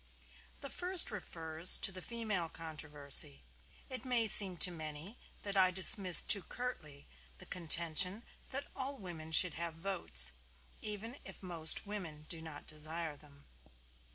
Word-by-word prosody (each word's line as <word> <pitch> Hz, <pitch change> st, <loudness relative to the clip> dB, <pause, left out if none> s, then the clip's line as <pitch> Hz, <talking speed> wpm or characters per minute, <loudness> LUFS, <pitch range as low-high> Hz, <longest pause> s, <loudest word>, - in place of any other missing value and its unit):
The 275 Hz, -, -7 dB
first 360 Hz, -6 st, +5 dB
refers 165 Hz, -4 st, +3 dB
to -, -, +4 dB
the 185 Hz, -1 st, -8 dB
female 215 Hz, -6 st, -4 dB
controversy. 150 Hz, -, 0 dB, 0.4 s
It 255 Hz, -1 st, -7 dB
may 245 Hz, -3 st, 0 dB
seem 195 Hz, -4 st, +3 dB
to 180 Hz, -, +3 dB
many 160 Hz, +6 st, -8 dB, 0.2 s
that 200 Hz, -1 st, -6 dB
I 190 Hz, -1 st, +3 dB
dismiss 185 Hz, 0 st, +6 dB
too 200 Hz, -, +3 dB
curtly 155 Hz, -, -8 dB, 0.3 s
the -, -, -12 dB
contention 175 Hz, +4 st, -1 dB, 0.3 s
that 275 Hz, +2 st, -4 dB
all 275 Hz, +1 st, -5 dB
women 165 Hz, -6 st, -9 dB
should 170 Hz, +1 st, +4 dB
have 170 Hz, -1 st, -6 dB
votes, 165 Hz, -, 0 dB, 0.5 s
even 215 Hz, +5 st, -7 dB
if -, -, -9 dB
most 165 Hz, -3 st, +2 dB
women 170 Hz, -8 st, -8 dB
do 165 Hz, -2 st, -4 dB
not 160 Hz, -2 st, -11 dB
desire 155 Hz, +1 st, -4 dB
them. 145 Hz, -1 st, -18 dB
175 Hz, 140 wpm, -33 LUFS, 155-205 Hz, 0.5 s, dismiss